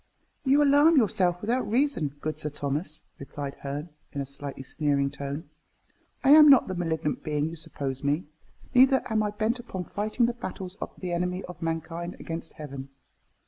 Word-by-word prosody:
"You 280 +2 +5
alarm 290 +3 +6
yourself 190 -7 +3
without 240 +3 0
reason, 230 - +1
good 155 0 -3
Sir 150 - -1
Thomas," 150 +2 -3 0.2
replied 140 0 -6
Herne, 145 +4 -5 0.2
in 140 - -3
a 140 - -2
slightly 140 0 -6
sneering 140 0 0
tone. 140 +2 -5 0.8
"I 270 - +5
am 300 0 +10
not 270 -3 +7
the 185 - -3
malignant 160 -4 -2
being 150 0 0
you 165 - -7
suppose 140 -4 -4
me; 145 +5 +1 0.5
neither 265 +1 +6
am 220 -1 +2
I 210 - +1
bent 220 +4 -1
upon 190 -6 -5
fighting 215 +6 0
the 240 - 0
battles 190 -6 -6
of - - -3
the 180 -2 -4
enemy 180 +2 -1
of 180 - -10
mankind 165 +2 -3
against 165 0 -6
Heaven. 140 -3 -8
170 Hz, 175 wpm, -27 LUFS, 145-220 Hz, 0.8 s, am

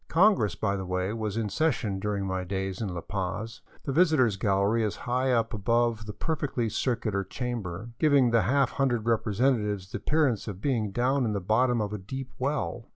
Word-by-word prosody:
Congress, 170 - +3
by 100 -2 0
the 95 - -3
way, 90 +2 -2
was 110 -2 -3
in 115 -2 0
session 110 -7 0
during 100 -1 -2
my 95 -1 -2
days 95 +1 -3
in 110 - -1
La 90 -1 -4
Paz. 100 +5 -4 0.2
The 140 - -2
visitors' 145 - +4
gallery 100 +3 +1
is 105 - -1
high 130 +2 +1
up 115 -2 +1
above 115 +1 +1
the - - -3
perfectly 135 -5 -2
circular 110 -3 -1
chamber, 115 -2 -5
giving 140 -6 +4
the 115 -1 +4
half 135 +7 +2
hundred 120 -5 0
representatives 105 -3 +1
the - - -4
appearance 145 -10 +1
of 100 -3 -5
being 115 -4 0
down 125 +6 +1
at 105 - -1
the 100 - -1
bottom 115 +6 +2
of 105 0 -3
a 105 - -3
deep 130 +7 -6
well. 135 -3 -2
115 Hz, 190 wpm, -28 LUFS, 100-130 Hz, 0.2 s, visitors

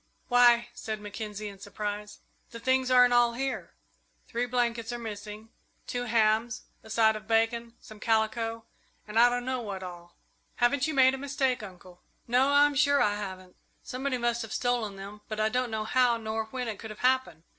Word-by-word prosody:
"Why," 240 -1 +5
said 220 -2 -5
Mackenzie, 210 0 -6
in 200 -1 -10
surprise, 205 +1 -6 0.3
"the 230 - -9
things 260 +1 +1
aren't 250 -1 +6
all 240 -1 +4
here. 265 +2 -4 0.5
Three 245 0 -2
blankets 240 -1 -1
are 240 - -3
missing, 215 -1 -8 0.4
two 245 0 -3
hams, 220 0 +1 0.2
a 220 - -15
side 220 0 +3
of 215 0 -8
bacon, 230 +1 +1
some 215 -1 -13
calico, 225 +1 0 0.4
and 210 +2 0
I 240 +1 +7
don't 245 0 -2
know 255 -1 -2
what 200 -4 -6
all." 175 -1 -10 0.4
"Haven't 255 +4 +2
you 310 - -3
made 260 -1 +6
a 270 - -4
mistake, 265 -2 -1
Uncle?" 180 -3 -12 0.3
"No, 250 +3 +3
I'm 290 0 +5
sure 285 0 +3
I 205 - +3
haven't. 185 -3 -7 0.3
Somebody 260 +1 -3
must 240 -1 0
have 225 -3 -6
stolen 240 -5 -1
them, 200 +2 -9
but 215 0 -5
I 215 0 +2
don't 250 +2 -1
know 220 -1 -2
how 245 +1 +3
nor 220 0 -3
when 250 +2 -5
it 215 -3 -5
could 220 - -8
have 215 - -10
happened. 255 -12 +1
230 Hz, 190 wpm, -28 LUFS, 215-245 Hz, 0.5 s, I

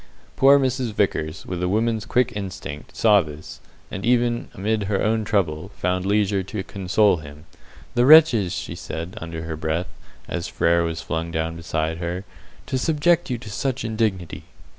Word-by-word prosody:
Poor 140 +1 +6
Mrs. 130 -4 0
Vickers, 80 -6 -1
with 90 -1 -4
a 90 - 0
woman's 110 +2 0
quick 125 0 +2
instinct, 95 -7 -7
saw 105 -3 +5
this, 75 -2 -9 0.3
and, 95 - -5
even 120 0 +1
amid 105 +2 -1
her 100 -1 0
own 110 0 +1
trouble, 95 -5 -1
found 90 +1 -1
leisure 100 -1 +2
to 95 +1 -5
console 100 +1 +2
him. 75 0 -11 0.5
"The 120 +1 +3
wretches!" 145 - +7
she - - -4
said, 85 +3 -6
under 80 0 -6
her 80 -1 -4
breath, 80 +3 -2 0.4
as 85 -1 -3
Frere 85 0 +2
was 80 -1 -3
flung 80 +2 -3
down 80 0 -2
beside 80 -1 -2
her, 90 +2 -3 0.4
"to 130 - -2
subject 165 +4 +2
you 125 - -1
to 110 -2 -10
such 130 +2 -2
indignity!" 110 -7 -2
95 Hz, 165 wpm, -23 LUFS, 85-115 Hz, 0.5 s, wretches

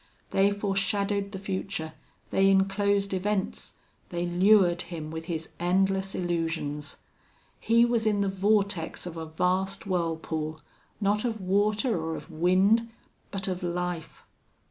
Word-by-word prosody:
They 195 +1 +4
foreshadowed 200 0 0
the 195 - -5
future, 190 -4 -4 0.4
they 195 0 +4
inclosed 200 +1 +2
events, 195 +1 -2 0.4
they 175 0 -2
lured 175 0 +4
him 165 -3 -6
with 160 0 -5
his 165 -2 -4
endless 190 +2 +1
illusions. 165 -4 -2 0.6
He 230 +1 +4
was 235 -2 +1
in 205 -1 +2
the 200 - +1
vortex 195 -3 0
of 175 -2 -6
a 160 -1 -5
vast 180 +4 0
whirlpool, 160 -3 -2 0.4
not 210 0 +1
of 230 -3 -2
water 205 +3 +1
or 160 0 -2
of - - -9
wind, 190 +8 +3 0.4
but 195 -1 -3
of 185 -1 -2
life. 175 -2 -3
190 Hz, 130 wpm, -28 LUFS, 170-200 Hz, 0.6 s, They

